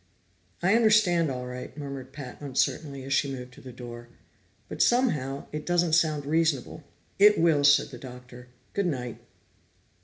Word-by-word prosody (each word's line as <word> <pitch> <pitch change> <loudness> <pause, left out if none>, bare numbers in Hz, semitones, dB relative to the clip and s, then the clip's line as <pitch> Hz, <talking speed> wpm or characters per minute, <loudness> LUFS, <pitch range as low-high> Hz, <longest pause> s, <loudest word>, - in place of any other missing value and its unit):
"I 190 +3 +4
understand 210 -8 +4
all 125 -1 -4
right," 125 +2 -8
murmured 140 -3 -7
Pat 135 -2 -9
uncertainly 140 0 -1
as 135 +1 -3
she 140 0 +1
moved 125 -1 -8
to - - -15
the 130 - -10
door. 120 -1 -9 0.6
"But - - -4
somehow, 150 - +1
it 150 0 -5
doesn't 175 -1 +1
sound 155 -3 +2
reasonable." 155 -1 0 0.4
"It 210 +1 +7
will," 160 -3 +3
said 145 0 +5
the 125 -4 -10
Doctor. 125 -1 -11 0.3
"Good 200 -2 0
night." 125 -7 -4
140 Hz, 155 wpm, -27 LUFS, 125-165 Hz, 0.6 s, It